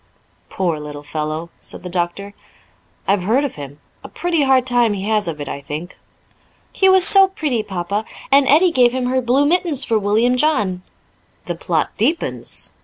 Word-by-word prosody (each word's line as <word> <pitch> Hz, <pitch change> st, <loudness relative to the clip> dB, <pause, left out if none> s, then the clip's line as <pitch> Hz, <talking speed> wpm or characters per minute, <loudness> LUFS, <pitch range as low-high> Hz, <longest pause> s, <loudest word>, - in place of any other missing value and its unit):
"Poor 170 Hz, -5 st, -2 dB
little 150 Hz, -1 st, -8 dB
fellow!" 155 Hz, +2 st, -4 dB
said -, -, -10 dB
the -, -, -6 dB
doctor. 180 Hz, +3 st, -3 dB, 0.7 s
"I've 195 Hz, -1 st, +2 dB
heard 230 Hz, +10 st, +1 dB
of 285 Hz, -, -3 dB
him; 145 Hz, 0 st, -10 dB, 0.2 s
a -, -, -9 dB
pretty 345 Hz, -3 st, -1 dB
hard 265 Hz, -2 st, +3 dB
time 240 Hz, -4 st, +2 dB
he 195 Hz, -1 st, -5 dB
has 215 Hz, -3 st, +1 dB
of 155 Hz, -2 st, -4 dB
it, 145 Hz, -, -6 dB
I 140 Hz, -, -6 dB
think." 155 Hz, +5 st, -8 dB, 0.7 s
"He 385 Hz, -, +3 dB
was 375 Hz, -1 st, +6 dB
so 390 Hz, -1 st, +6 dB
pretty, 300 Hz, -11 st, -2 dB
Papa. 200 Hz, +2 st, -4 dB, 0.3 s
And 275 Hz, 0 st, +5 dB
Edie 335 Hz, +6 st, +4 dB
gave 250 Hz, -5 st, +3 dB
him 255 Hz, -1 st, -2 dB
her 260 Hz, +1 st, 0 dB
blue 255 Hz, +4 st, +2 dB
mittens 325 Hz, -3 st, +1 dB
for 225 Hz, -2 st, +1 dB
William 220 Hz, +5 st, +1 dB
John." 210 Hz, -11 st, 0 dB, 0.6 s
"The -, -, -3 dB
plot -, -, -2 dB
deepens. 330 Hz, -, -2 dB
220 Hz, 180 wpm, -19 LUFS, 175-280 Hz, 0.7 s, was